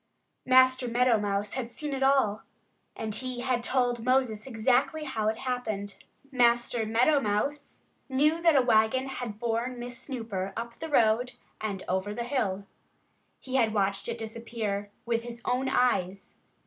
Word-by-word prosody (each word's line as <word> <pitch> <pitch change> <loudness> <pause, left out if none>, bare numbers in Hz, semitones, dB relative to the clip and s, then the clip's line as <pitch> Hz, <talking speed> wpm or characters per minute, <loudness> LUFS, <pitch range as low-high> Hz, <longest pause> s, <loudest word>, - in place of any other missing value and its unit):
Master 255 0 +5
Meadow 240 -1 +3
Mouse 205 0 -2
had 245 -2 -4
seen 295 +2 -5
it 270 - -3
all; 265 -6 +3 0.5
and 220 -1 -4
he 250 +2 -3
had 250 -2 0
told 245 -2 0
Moses 255 -3 +1
exactly 255 +6 +1
how 225 -7 -2
it 220 0 0
happened. 220 -6 -3 0.3
Master 240 -2 +2
Meadow 250 +7 +3
Mouse 275 +8 -2 0.3
knew 300 +5 +2
that 335 -2 +5
a 265 - +5
wagon 235 +3 +3
had 245 -5 -5
borne 235 +2 -2
Miss 245 0 -7
Snooper 215 -8 -4
up 235 0 -6
the 320 - -5
road 240 -2 +3 0.3
and 205 -3 -3
over 190 +3 -1
the 235 - -3
hill. 210 -7 -1 0.7
He 265 0 -2
had 220 -3 +2
watched 195 -1 0
it 235 0 -3
disappear, 220 -2 -4 0.2
with 230 -1 0
his 235 0 -7
own 255 +2 0
eyes. 195 -7 0
235 Hz, 155 wpm, -28 LUFS, 215-255 Hz, 0.7 s, Master